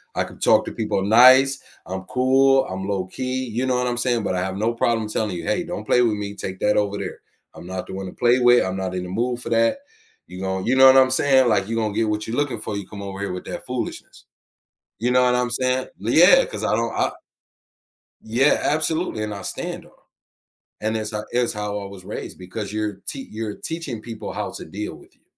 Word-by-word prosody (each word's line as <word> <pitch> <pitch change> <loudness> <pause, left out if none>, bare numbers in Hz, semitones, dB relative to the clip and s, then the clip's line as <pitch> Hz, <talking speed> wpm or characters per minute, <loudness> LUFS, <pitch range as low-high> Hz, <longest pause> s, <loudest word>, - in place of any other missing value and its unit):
I - - +1
can - - -11
talk - - +4
to - - -5
people 95 - -1
nice, 130 +5 +6 0.2
I'm 95 +1 -5
cool, 135 +2 +3
I'm 95 +1 -5
low-key, 130 +7 -2
you 120 +3 -2
know 125 - +1
what 125 - 0
I'm 120 - -1
saying, 120 -2 0
but - - -1
I 90 - 0
have 95 +1 -3
no 115 +3 0
problem 115 -2 0
telling 105 -3 -2
you, - - -6
"Hey, 180 0 0
don't 175 +1 -6
play 125 - +3
with 115 -3 +2
me, 100 0 -5
take 95 -1 -6
that 105 - +2
over 105 -1 0
there. - - -6 0.3
I'm 90 - -11
not 95 0 -5
the - - -8
one 95 0 -5
to - - -9
play 120 +1 +3
with, 120 0 +5
I'm 95 0 -3
not 95 -1 -3
in 90 - -3
the 90 - -7
mood 120 +5 -1
for - - -6
that." 115 0 +2 0.5
You 90 - -9
know 95 0 -2
you 125 - +2
know 130 0 +9
what 130 - +8
I'm 130 -1 +5
saying, 130 -1 +4
like, 105 - +1
"You 115 - -3
gonna 110 -2 -1
get 110 0 0
what 105 0 -2
you're 115 +4 -3
looking 130 -7 -1
for, 110 - -4
you 100 -2 -6
come 100 -2 -9
over 100 -1 -6
here 100 -2 -3
with 90 - -6
that - - -6
foolishness." - - -6 0.7
You 120 +2 0
know 125 0 +4
what 125 0 +3
I'm 125 0 0
saying? 130 +2 0 0.2
L 115 - -1
yeah, 180 - +7
'cause 105 0 -7
I 110 - +1
don't 115 +1 -1
I - - +1 1.1
Yeah, 125 +6 +3
absolutely, 155 -6 0
and 105 - -4
I 100 - -7
stand - - -5
on - - -19
'em. - - -28 0.8
And 110 +1 -1
it's 110 0 -4
ho 105 0 -3
it's 120 -1 +1
how 105 -1 -3
I 100 - -7
was 95 -2 -11
raised 105 - -7
because 95 +4 -6
you're 105 -2 -3
tea 135 -1 -6
you're 110 -1 -4
teaching 160 -8 -5
people 110 -2 -7
how - - -4
to - - -9
deal 105 +6 -6
with - - -19
you. - - -38
110 Hz, 245 wpm, -22 LUFS, 100-125 Hz, 1.1 s, know